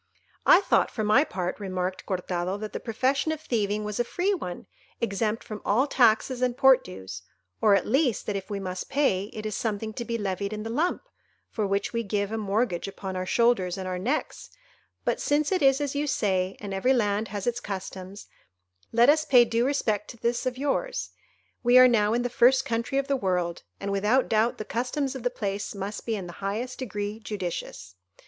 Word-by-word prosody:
"I - - +8
thought, - - +2
for 220 - -3
my 215 +7 +5
part," 180 - -4
remarked 185 -2 -3
Cortado, 180 0 -2
"that 215 0 -6
the - - -3
profession 260 +7 0
of 315 - -3
thieving 215 -7 -1
was 210 +2 -4
a - - +4
free 360 - 0
one, 180 - -5 0.3
exempt 220 0 -1
from 215 -1 -7
all 235 +7 +3
taxes 245 -1 +3
and 250 -1 +1
port 265 -1 +6
dues; 95 0 -8 0.4
or, 210 -2 +6
at - - +1
least, 265 -1 +1
that 210 - -2
if 195 -1 -5
we 200 -1 -3
must 185 -1 -5
pay, 200 -10 +1
it 215 +1 -8
is 215 -2 -2
something 220 0 -2
to 235 - -4
be 235 0 -2
levied 200 0 -3
in 215 0 -4
the 225 - -4
lump, 325 +9 0 0.5
for 215 -3 -1
which 200 +3 -1
we 230 - 0
give 205 -1 -2
a 225 - -2
mortgage 205 -3 0
upon 195 -1 -6
our 185 0 -3
shoulders 220 -7 +2
and 190 -1 -5
our 180 -1 -3
necks; 255 +11 -2 0.6
but - - 0
since 290 +3 +1
it 375 - +1
is 270 0 +5
as 285 -2 -2
you 290 +1 -1
say, 190 -7 0
and 200 -2 -6
every 220 +8 +2
land 210 -3 +1
has 205 -2 -5
its 240 0 0
customs, 190 -1 -7 0.7
let 235 +1 +5
us 305 +2 +5
pay 250 -5 +6
due 230 +2 +1
respect 215 -7 0
to 235 - -10
this 235 +2 -1
of 255 0 -2
yours; 290 - -2 0.5
we 245 +1 +5
are 255 0 +9
now 215 -4 +3
in 240 - 0
the - - +1
first 255 +2 +4
country 235 +1 -1
of 275 0 0
the 280 - +2
world, 180 -7 -1 0.2
and 200 0 -3
without 210 +7 +2
doubt 225 +2 +2
the 215 - -5
customs 255 +3 -2
of 265 - -6
the 245 - +1
place 200 -2 -4
must 200 +3 -5
be 225 - 0
in 195 -3 -5
the 175 - -8
highest 225 +6 -3
degree 210 -3 -4
judicious. 175 - -5
215 Hz, 210 wpm, -26 LUFS, 195-250 Hz, 0.7 s, are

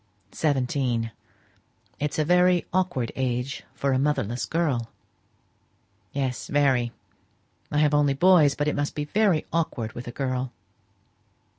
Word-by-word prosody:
"Seventeen. 125 -5 0 0.9
It's 145 +1 -2
a 155 - +2
very 180 +1 +4
awkward 175 -11 0
age 130 +1 -2
for 140 -1 0
a 130 - +2
motherless 130 -5 0
girl." 140 -9 0 1.2
"Yes; 135 -3 -2
very. 135 -5 +2 0.8
I 150 - 0
have 150 0 +3
only 145 -2 +3
boys, 160 -3 +5
but 145 - -1
it 150 - 0
must 145 0 -2
be 150 - -2
very 190 -1 +2
awkward 150 -10 -1
with 120 +1 -8
a - - -4
girl. 130 -1 -2
140 Hz, 130 wpm, -25 LUFS, 125-155 Hz, 1.2 s, boys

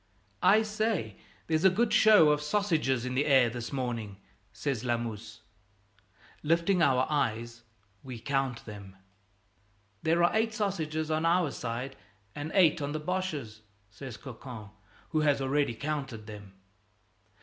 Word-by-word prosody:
"I 220 +1 +5
say, 215 - -2 0.3
there's 160 +1 0
a 190 - +8
good 215 +4 +1
show 210 -8 +7
of 150 0 +1
sausages 150 - 0
in 125 - -3
the 140 +4 +1
air 130 -5 +5
this 120 0 -6
morning," 120 -7 -3 0.3
says 135 -6 -3
Lamuse. 115 -2 -3 1.0
Lifting 170 +4 +2
our 130 -4 +4
eyes, 120 -5 -2 0.4
we 130 -3 -8
count 135 0 -2
them. 100 -3 -10 1.1
"There 165 +2 +2
are 175 - +3
eight 220 0 +1
sausages 160 -7 -2
on 155 +1 0
our 170 -2 +2
side 125 +3 -5 0.4
and 145 +2 -5
eight 170 -4 +5
on 145 +1 -3
the 155 - -2
Boches'," 150 -10 -3 0.3
says 120 +2 -9
Cocon, 120 -5 -9 0.4
who 155 - 0
has 145 -2 +3
already 135 -2 0
counted 135 -6 -4
them. 105 -2 -10
140 Hz, 140 wpm, -29 LUFS, 120-165 Hz, 1.1 s, a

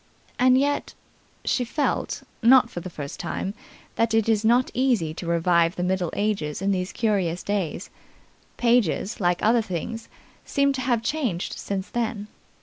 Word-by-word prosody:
And 255 0 +5
yet 285 +2 0 0.5
she 250 - +1
felt 280 +5 -2 0.2
not 245 0 +6
for - - -5
the 185 - -7
first 145 -4 -7
time 195 - -3 0.4
that 230 -1 +2
it 225 -1 +2
is 220 -1 +2
not 240 +3 +3
easy, 240 -12 +1
to 170 +1 -7
revive 170 0 +2
the 180 - -2
Middle 180 -1 0
Ages 195 -8 -1
in 195 +1 0
these 185 -1 -1
curious 190 -6 0
days. 200 -6 -2 0.7
Pages 235 -3 +1
like 175 -2 +1
other 230 +2 +4
things, 220 +3 -5 0.3
seem 280 0 +1
to 265 - -3
have 240 -3 0
changed 240 - -2
since 195 -1 -4
then. 225 -3 -2
210 Hz, 155 wpm, -24 LUFS, 180-240 Hz, 0.7 s, not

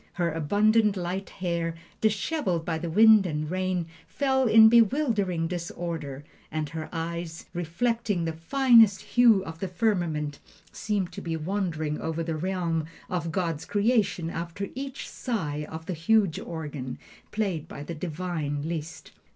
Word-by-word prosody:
"Her 170 -2 0
abundant 205 +6 +3
light 185 +2 -3
hair, 170 -3 -2 0.3
disheveled 210 - 0
by 165 -2 -1
the 170 - -4
wind 215 +2 +7
and 155 -1 -3
rain, 185 -2 -1 0.2
fell 265 -2 +1
in 220 0 +8
bewildering 220 - +3
disorder, 165 -5 -5 0.3
and 155 -1 -2
her 160 -1 -6
eyes, 165 0 -4
reflecting 195 +3 -1
the 165 - -2
finest 225 - +5
hue 230 -6 +4
of 160 0 -8
the 190 - -2
firmament, 175 -7 -1 0.3
seemed 200 -4 -2
to - - -7
be 165 -1 -3
wandering 160 -3 -2
over 160 +1 -2
the 165 -1 -2
realm 170 -2 -1 0.3
of 170 -2 -2
God's 165 -3 -1
creation 200 -6 +1
after 170 +4 -4
each 270 +1 -6
sigh 150 - -3
of 160 0 -7
the 185 - -3
huge 185 +2 +2
organ, 145 -6 -6 0.3
played 190 -8 -2
by 145 - -8
the 170 - -6
divine 155 -3 -3
Liszt. 165 -1 -6
175 Hz, 145 wpm, -27 LUFS, 160-205 Hz, 0.3 s, in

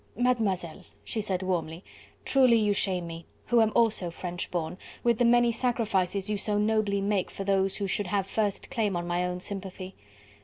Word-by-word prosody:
"Mademoiselle," 210 -9 0 0.2
she 220 - -3
said 190 -3 -2
warmly, 175 -2 -2 0.4
"truly 255 -4 +5
you 210 -2 +2
shame 185 -3 -1
me, 165 0 -7 0.3
who 240 -1 +5
am 220 -1 +3
also 220 -6 +3
French 175 +1 -5
born, 170 -1 -3 0.3
with 235 -2 +2
the - - +4
many 240 0 +5
sacrifices 210 -5 0
you 210 0 0
so 205 +1 0
nobly 210 -1 +1
make 200 -1 0
for 195 - -6
those 195 -1 +1
who 200 - -2
should 200 0 -1
have 195 0 0
first 205 0 -2
claim 210 -4 0
on 175 0 -2
my 175 +1 0
own 180 0 -2
sympathy. 190 0 -6
200 Hz, 185 wpm, -28 LUFS, 180-220 Hz, 0.4 s, truly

